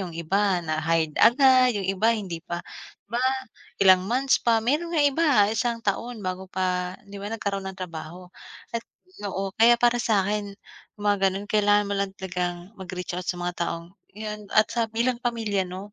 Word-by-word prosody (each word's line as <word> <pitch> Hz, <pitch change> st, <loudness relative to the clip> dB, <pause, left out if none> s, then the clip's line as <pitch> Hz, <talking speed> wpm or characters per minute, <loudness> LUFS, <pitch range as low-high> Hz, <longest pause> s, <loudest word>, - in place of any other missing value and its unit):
yung 180 Hz, -3 st, -5 dB
iba 185 Hz, +2 st, +1 dB
na 155 Hz, 0 st, -1 dB
hired 160 Hz, -1 st, +1 dB
agad. 255 Hz, -1 st, +6 dB
Yung 195 Hz, -, -2 dB
iba, 195 Hz, +4 st, +1 dB
hindi 185 Hz, -6 st, -5 dB
pa 175 Hz, 0 st, -6 dB, 0.4 s
ba 235 Hz, +4 st, -3 dB, 0.6 s
ilang 190 Hz, -2 st, +6 dB
months 255 Hz, +1 st, +2 dB
pa, 225 Hz, -2 st, +2 dB
meron 330 Hz, +7 st, 0 dB
nga 300 Hz, -, +4 dB
iba 290 Hz, +4 st, +2 dB, 0.3 s
isang 235 Hz, +2 st, 0 dB
taon 215 Hz, +1 st, -2 dB
bago 185 Hz, +1 st, -4 dB
pa 180 Hz, -1 st, -2 dB
'di 200 Hz, 0 st, -10 dB
ba, 205 Hz, -, -5 dB
nagkaroon 200 Hz, -3 st, -3 dB
ng 190 Hz, -, -8 dB
trabaho. 180 Hz, 0 st, -8 dB, 0.4 s
At 230 Hz, -, -1 dB, 0.5 s
oo, 195 Hz, 0 st, -3 dB
kaya 235 Hz, +1 st, +7 dB
para 240 Hz, 0 st, +2 dB
sa 205 Hz, -5 st, +2 dB
akin 205 Hz, -1 st, -3 dB, 0.4 s
yung 205 Hz, -, -9 dB
mga 200 Hz, -2 st, +3 dB
ganun 195 Hz, +2 st, -4 dB
kailangan 205 Hz, 0 st, +3 dB
mo 200 Hz, -, -3 dB
lang 200 Hz, 0 st, -1 dB
talagang 180 Hz, -2 st, -3 dB, 0.2 s
mag-reach 180 Hz, -1 st, -5 dB
out 180 Hz, 0 st, -5 dB
sa 180 Hz, -, -1 dB
mga 175 Hz, 0 st, -3 dB
taong 170 Hz, 0 st, -2 dB, 0.3 s
yun 210 Hz, -1 st, -6 dB
at 215 Hz, 0 st, +4 dB
sa 230 Hz, -2 st, 0 dB
bilang 235 Hz, +2 st, -1 dB
pamilya 215 Hz, -6 st, -1 dB
'no 190 Hz, +3 st, -8 dB
200 Hz, 185 wpm, -25 LUFS, 185-225 Hz, 0.6 s, kaya